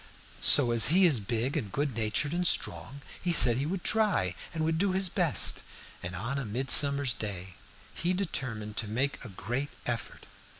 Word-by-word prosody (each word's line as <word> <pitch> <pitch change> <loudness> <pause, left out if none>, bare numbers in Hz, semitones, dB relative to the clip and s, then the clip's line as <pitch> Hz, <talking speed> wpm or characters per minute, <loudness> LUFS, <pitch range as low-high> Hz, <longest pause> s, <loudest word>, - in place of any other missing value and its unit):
So, 125 -5 +6
as 115 -1 +4
he 180 +7 +3
is 150 -9 +3
big 115 +5 -3
and 100 - -4
good 145 +2 -3
natured 115 +7 -2
and 175 0 -1
strong, 140 -3 -1 0.2
he 180 - -2
said 125 -8 +5
he 140 +3 -3
would 180 +1 -5
try, 205 - 0 0.2
and 160 -1 -3
would 160 0 -1
do 195 0 0
his 190 -1 0
best; - - +1 0.4
and 90 +2 -7
on 115 +3 -5
midsummer's 135 +2 +4
day 95 -4 -7 0.4
he 175 +2 -2
determined 115 - -5
to 115 - -2
make 130 +8 -3
a 120 - -9
great 120 +9 -5 0.2
effort. 115 -2 -6
130 Hz, 175 wpm, -28 LUFS, 110-160 Hz, 0.4 s, So